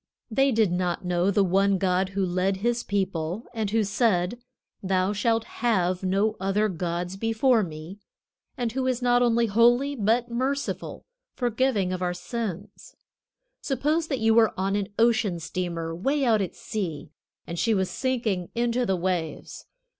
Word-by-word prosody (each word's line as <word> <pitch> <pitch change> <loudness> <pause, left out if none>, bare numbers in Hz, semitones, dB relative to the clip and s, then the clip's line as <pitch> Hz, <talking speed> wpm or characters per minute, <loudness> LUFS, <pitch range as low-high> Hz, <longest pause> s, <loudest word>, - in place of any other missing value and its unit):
They 270 +4 +3
did 220 -5 +2
not 180 +1 -1
know 180 +1 +1
the 200 0 +3
one 195 +1 +2
God 185 0 +1
who 195 - +2
led 185 +2 0
His 235 +4 0
people, 190 -1 -2
and 220 -3 -2
who 220 +1 +2
said, 205 0 +1 0.4
"Thou 190 +1 +1
shalt 225 +2 +1
have 185 -8 0
no 200 +3 +1
other 195 +3 +1
gods 175 +1 -3
before 225 +3 +2
me," 165 +2 -7 0.6
and 240 -2 -1
who 260 +2 -1
is 255 -1 -1
not 245 0 +4
only 235 -1 +3
holy, 240 +6 +3
but 235 +2 +1
merciful, 265 +4 -3 0.3
forgiving 240 -6 0
our 180 -1 -2
sins. 205 0 -6 0.7
Suppose 300 +5 0
that 275 - -1
you 225 -1 +3
were 220 -3 +3
on 195 +1 0
an 205 -1 -1
ocean 225 -6 +2
steamer 165 -1 -4
way 270 - 0
out 220 -4 +3
at 190 - -4
sea, 165 -9 -5 0.3
and 170 0 -5
she 225 -2 +2
was 190 -1 +1
sinking 230 -9 -1
into 240 +1 0
the 190 - +2
waves. 175 -3 -3
205 Hz, 155 wpm, -26 LUFS, 185-235 Hz, 0.7 s, not